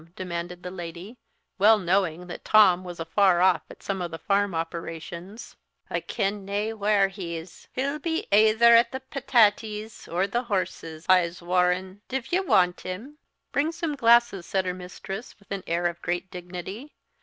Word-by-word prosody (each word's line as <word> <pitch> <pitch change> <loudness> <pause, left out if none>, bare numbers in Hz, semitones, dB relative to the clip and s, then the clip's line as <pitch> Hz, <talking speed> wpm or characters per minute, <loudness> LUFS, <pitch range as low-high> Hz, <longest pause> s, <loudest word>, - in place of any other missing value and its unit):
demanded 175 -1 -5
the 180 - -5
lady, 175 +4 -8 0.4
well 215 +3 +7
knowing 180 -2 0
that 175 - -8
Tom 185 -4 +5
was 175 -2 -8
afar 175 +2 +3
off 180 -3 +4
at - - -14
some 195 -2 -3
of 175 - -3
the 165 - -6
farm 200 0 0
operations. 170 +4 -6 0.4
"I - - 0
ken 200 +1 -2
nae 205 +3 -2
whar 205 -2 +3
he's. 175 -3 -8
He'll 280 +4 -2
be 320 +1 -2
aether 220 +3 +6
at 235 0 +5
the 260 0 -5
patatees, 220 -5 +1
or 180 +3 0
the 235 +5 -1
horses, 175 -6 -3
I'se 180 -2 +3
warran. 180 +2 0
Div 265 -1 -4
ye 360 - +3
want 180 - +2
him?" 235 +12 -7 0.3
"Bring 295 +3 +1
some 330 -2 -3
glasses," 235 - +4
said 190 -1 0
her 180 - -1
mistress, 185 +4 -8
with 200 -1 -26
an 200 -1 -2
air 170 +1 0
of 175 0 -1
great 175 +1 -3
dignity. 180 - -8
190 Hz, 165 wpm, -26 LUFS, 175-220 Hz, 0.4 s, well